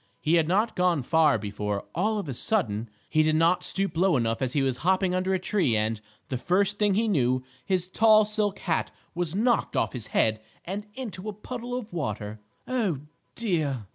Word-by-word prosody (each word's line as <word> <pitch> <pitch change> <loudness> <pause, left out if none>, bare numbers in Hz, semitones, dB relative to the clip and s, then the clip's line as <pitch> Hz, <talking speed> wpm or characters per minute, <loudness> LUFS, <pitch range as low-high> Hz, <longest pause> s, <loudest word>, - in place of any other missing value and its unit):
He 155 - 0
had 165 -2 +4
not 205 +6 +1
gone 180 -6 +2
far 155 +1 +4
before, 105 -1 -3
all 215 +6 +1
of 200 - -4
a 135 - -3
sudden, 120 - 0 0.2
he 155 - +3
did 155 0 +2
not 165 +3 +3
stoop 195 -3 0
low 175 -2 +3
enough 115 0 -1
as 130 -1 -1
he 140 - +2
was 130 -2 0
hopping 185 +4 +1
under 185 +1 0
a 190 - +3
tree 180 - +1
and, 110 0 -1 0.3
the 130 - -2
first 195 +8 +1
thing 205 -2 +3
he 225 +2 +2
knew, 130 - +1 0.2
his 180 +1 0
tall 215 +2 +5
silk 210 -1 -1
hat 165 -4 -1 0.2
was 175 0 -2
knocked 235 +3 +1
off - - 0
his 120 -5 -6
head 110 0 +1 0.2
and 205 +4 -5
into 215 -6 -6
a - - -5
puddle 245 +4 -6
of 230 -5 -7
water. 110 -9 -4 0.3
"Oh, 215 - 0 0.3
dear!" 155 - -1
175 Hz, 200 wpm, -27 LUFS, 130-205 Hz, 0.3 s, tall